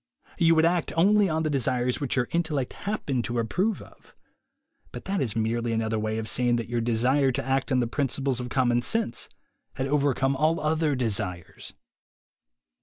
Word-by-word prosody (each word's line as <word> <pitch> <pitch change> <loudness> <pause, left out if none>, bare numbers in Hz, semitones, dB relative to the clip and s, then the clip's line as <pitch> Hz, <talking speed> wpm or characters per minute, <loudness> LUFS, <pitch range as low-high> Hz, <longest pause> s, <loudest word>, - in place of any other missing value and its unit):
You 165 -1 +5
would 160 0 +4
act 175 0 +1
only 200 +3 +4
on 160 0 0
the 155 - 0
desires 125 -2 0
which 140 - -1
your 125 -2 +1
intellect 155 -6 -1 0.2
happened 140 - -1
to 120 - -3
approve 185 - -1
of; - - -20 0.8
but - - -9
that 195 -3 -1
is 115 -5 -1
merely 115 +1 -1
another 110 -1 -1
way 110 0 -2
of 110 -1 -4
saying 120 +1 +2
that 115 -1 -3
your 120 0 -1
desire 125 +4 +2
to - - -3
act 135 0 0
on 130 -1 +3
the - - +1
principles 135 0 -1
of 125 0 -5
common 120 -2 +2
sense 125 - -1 0.5
had 130 - -2
overcome 135 -1 +1
all 155 +4 +1
other 155 -1 +1
desires. 100 -8 -3
130 Hz, 180 wpm, -26 LUFS, 120-155 Hz, 0.8 s, You